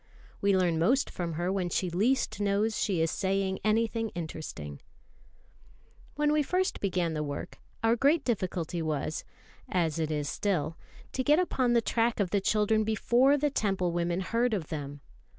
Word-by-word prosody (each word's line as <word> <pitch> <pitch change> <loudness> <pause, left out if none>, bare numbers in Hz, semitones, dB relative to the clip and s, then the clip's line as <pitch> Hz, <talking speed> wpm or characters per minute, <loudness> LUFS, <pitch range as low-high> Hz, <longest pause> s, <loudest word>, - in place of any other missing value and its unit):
We 200 -1 +3
learn 175 -3 +2
most 255 +11 +2
from 170 -2 -3
her 175 +3 -1
when 190 -2 -1
she 180 +1 -1
least 220 +5 +1
knows 205 +2 +1
she 185 -5 0
is 165 - +1
saying 190 0 0
anything 225 +1 +1
interesting. 155 - -6 1.3
When 295 +1 +2
first 365 +6 0
we 200 - +1
began 175 -3 0
the 155 - -2
work, 145 -1 -5 0.2
our 225 +1 +4
great 285 +5 +3
difficulty 180 -7 -1
was, 155 -1 -2 0.5
as 165 -4 0
it 160 -1 0
is 150 -2 -1
still, 165 -3 -1 0.4
to 260 - -1
get 295 +3 +4
upon 260 -9 +1
the 235 -1 +3
track 230 0 +1
of 190 -3 0
the 200 - +2
children 215 +2 +2
before 240 +6 +3
the 295 0 +1
Temple 195 -8 0
women 175 +1 -1
heard 230 +4 +1
of 165 -6 -4
them. 145 -2 -5
195 Hz, 170 wpm, -29 LUFS, 170-230 Hz, 1.3 s, our